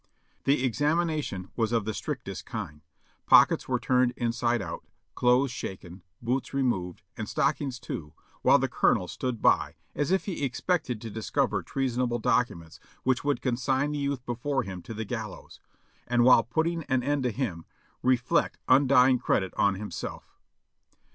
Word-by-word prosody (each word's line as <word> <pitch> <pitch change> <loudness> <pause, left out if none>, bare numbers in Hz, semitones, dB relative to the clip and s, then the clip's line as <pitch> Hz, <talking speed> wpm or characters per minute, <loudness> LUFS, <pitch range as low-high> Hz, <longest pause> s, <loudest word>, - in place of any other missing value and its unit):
The 135 -1 +3
examination 150 - -1
was 115 -2 0
of 115 -3 +1
the 110 - -2
strictest - - -5
kind; 75 0 -6 0.5
pockets - - +6
were - - 0
turned 125 -1 +2
inside 120 0 0
out, 85 -4 -6 0.3
clothes 125 +2 +3
shaken, 95 -6 -7 0.2
boots 130 +3 -2
removed, 95 -10 -1
and - - -5
stockings 135 -4 0
too, 75 -9 -6 0.3
while - - +6
the - - 0
colonel 90 - +2
stood 125 0 -4
by - - +3 0.2
as 145 - -1
if 190 +1 +1
he 185 -7 -4
expected 135 - -1
to 115 -2 -6
discover 110 0 0
treasonable 125 -2 -1
documents 85 -8 -1 0.2
which 130 -1 +1
would 145 -1 0
consign 130 +3 0
the 150 - -2
youth 140 -3 -2
before 130 +3 -1
him 95 -3 -7
to 110 +6 -8
the 110 +1 -4
gallows; 110 -2 -7 0.5
and 120 0 +3
while 125 -1 +7
putting 160 +8 -1
an 130 -3 0
end 145 +1 0
to 125 -2 0
him, 100 -10 -3 0.4
reflect 125 -1 +2
undying 130 -1 +5
credit 95 -5 0
on 100 -1 +2
himself. 100 -2 -7
125 Hz, 155 wpm, -28 LUFS, 110-135 Hz, 0.5 s, while